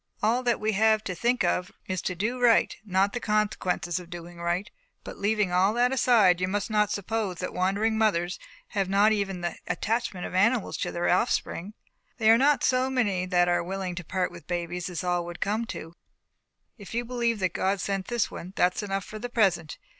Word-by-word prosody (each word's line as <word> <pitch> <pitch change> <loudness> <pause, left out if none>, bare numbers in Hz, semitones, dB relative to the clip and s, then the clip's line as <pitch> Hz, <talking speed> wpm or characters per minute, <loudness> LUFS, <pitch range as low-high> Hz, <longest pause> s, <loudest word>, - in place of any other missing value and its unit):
All 230 +4 +3
that 240 -2 +1
we 215 +1 0
have 215 +1 +3
to 185 - -3
think 240 +7 +1
of 180 +1 0
is 185 -1 -3
to 185 - -3
do 225 +8 -2
right 235 -2 +4
not 195 0 +1
the 245 - -2
consequences 205 -6 0
of 175 -1 -12
doing 175 -1 -9
right. 175 +4 -1 0.4
But - - -9
leaving 205 -2 +1
all 190 +4 +3
that 245 +1 +3
aside, 215 -9 +4
you 185 - +1
must 205 +3 -2
not 210 -1 +3
suppose 205 -2 -2
that 180 - -4
wandering 205 +4 +1
mothers 180 -5 +1 0.3
have 195 -3 -1
not 200 +2 +4
even 195 -4 -1
the 175 - -3
attachment 225 -5 -2
of - - -7
animals 215 +4 +2
to - - -2
their 175 0 -1
offspring. 195 0 0 0.4
There 225 -1 +6
are - - +6
not 290 +2 +3
so 255 0 +2
many 205 -8 0
that 175 -1 +3
are 175 0 +2
willing 190 0 -4
to 175 0 -6
part 180 +3 -1
with - - -12
babies 175 0 -3
as 175 -1 -4
all 180 -1 +1
that - - -7
would 175 0 -8
come 215 +3 -1
to. 165 -6 -7 0.9
If 205 +2 -9
you 240 +1 -1
believe 235 -2 0
that 185 -3 -1
God 195 +1 0
sent 195 0 -2
this 240 -2 0
one, 180 +3 -8
that 180 0 +3
is - - -1
enough 195 -1 -3
for 215 - -8
the 245 +2 -5
present. 185 -9 +1
200 Hz, 215 wpm, -27 LUFS, 180-220 Hz, 0.9 s, There